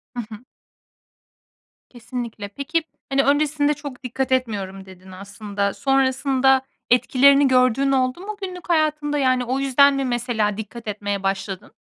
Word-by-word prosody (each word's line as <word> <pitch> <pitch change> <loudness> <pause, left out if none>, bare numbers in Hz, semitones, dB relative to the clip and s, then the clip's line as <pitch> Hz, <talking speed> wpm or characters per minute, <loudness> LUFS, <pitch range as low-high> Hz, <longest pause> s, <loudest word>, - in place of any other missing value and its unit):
I - - -4
hı. 220 0 -11 1.5
Kesinlikle. 240 -3 -6
Peki, 285 +10 -2 0.3
hani, 275 0 +2
"Öncesinde 295 +1 +2
çok 285 -3 -9
dikkat 260 +1 -3
etmiyorum." 200 -7 -2
dedin 190 0 -14
aslında. 200 +1 -4
Sonrasında 265 0 +2 0.3
etkilerini 275 +3 +5
gördüğün 255 +1 +3
oldu 255 +2 +1
mu 415 +2 -7
günlük 365 -2 -7
hayatında, 305 -2 +1
yani, 255 -2 +2
o 260 +3 -1
yüzden 275 +1 +4
mi 275 -1 -1
mesela 235 -4 -1
dikkat 220 +2 -8
etmeye 205 -1 -3
başladın? 195 -1 -3
255 Hz, 130 wpm, -22 LUFS, 210-280 Hz, 1.5 s, etkilerini